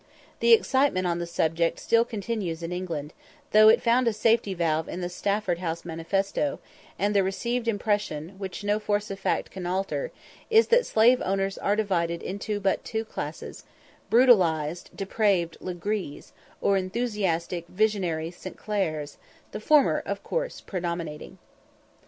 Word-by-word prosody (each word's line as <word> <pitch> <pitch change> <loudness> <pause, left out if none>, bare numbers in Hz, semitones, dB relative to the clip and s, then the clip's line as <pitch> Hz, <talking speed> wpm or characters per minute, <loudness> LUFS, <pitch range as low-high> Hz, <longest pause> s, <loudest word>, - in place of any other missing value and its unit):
] - - -25
The 235 0 +3
excitement 260 -5 +3
on 175 -1 0
the 170 - -3
subject 165 0 0
still 230 0 +3
continues 205 -7 -4
in 165 - -4
England, 165 -5 -4 0.4
though 215 0 +8
it 220 - +4
found 240 +1 +3
a 230 - +2
safety 215 -2 +2
valve 160 -2 0
in 180 - -5
the 175 - -2
Stafford 200 -1 -1
House 170 -1 -4
manifesto, 195 - -1 0.4
and 205 +1 +1
the 200 - +5
received 235 +5 -2
impression, 205 -8 -1
which 195 0 -6
no 205 +1 +1
force 210 -1 -1
of 195 - -6
fact - - -1
can 185 -2 -6
alter, 195 - -2 0.4
is, 450 0 +5
that 485 +1 +4
slave 240 +3 +4
owners 195 +1 -1
are 205 - +1
divided 170 -5 -1
into 205 +2 -3
but 195 -1 0
two 220 0 -3
classes - - -7 0.5
brutalised 175 - +3
depraved 195 -4 0
"Legrees," 185 -3 -4 0.3
or 200 - +3
enthusiastic, 185 -5 -2
visionary 180 -5 0
"St. 185 +1 -10
Clairs" 155 -9 -3 0.3
the 210 - -5
former, 295 +6 +4
of - - -4
course, - - -3
predominating. 170 -4 -5
195 Hz, 150 wpm, -26 LUFS, 170-215 Hz, 0.5 s, though